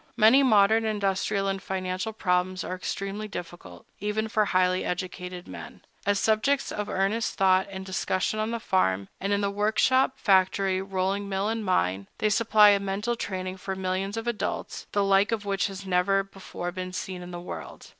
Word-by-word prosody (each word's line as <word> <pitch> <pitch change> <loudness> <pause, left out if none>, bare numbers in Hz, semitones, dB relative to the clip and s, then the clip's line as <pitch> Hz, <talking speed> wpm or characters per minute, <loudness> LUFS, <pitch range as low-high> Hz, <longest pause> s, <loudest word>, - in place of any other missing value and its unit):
Many 230 +5 +7
modern 220 -3 +5
industrial 200 -1 0
and 195 0 -2
financial 185 +2 -3
problems 185 -3 0
are - - -4
extremely 195 +3 -4
difficult, 170 - -9
even 215 +2 -2
for 215 -1 +2
highly 185 -1 +2
educated 180 0 -5
men. - - -10 0.3
As 205 -1 +3
subjects 225 +7 +1
of 210 -1 -4
earnest 200 +4 0
thought 190 -1 +3
and 190 -1 -7
discussion 190 +2 -1
on 215 +1 0
the 235 0 -2
farm, 100 - +1
and 195 +1 -2
in 200 0 +2
the 200 0 0
work 210 +2 0
shop, 260 0 +4
factory, 190 -1 +2
rolling 195 +1 -2
mill, 195 +2 -1
and 225 0 -2
mine, 95 - 0
they 215 - +1
supply 215 -1 +6
a 200 -1 +4
mental 200 +4 -2
training 185 -3 -4
for 190 +1 -4
millions 190 +2 -2
of 225 - -3
adults, 235 -3 -3
the 205 - +2
like 195 +2 +3
of 215 -3 -2
which 200 0 0
has 195 0 -8
never 190 +2 +2
before 190 -2 -7
been 185 0 -6
seen 185 0 -5
in 175 - -8
the 175 -1 -6
world. 175 - -8
195 Hz, 185 wpm, -27 LUFS, 185-210 Hz, 0.3 s, Many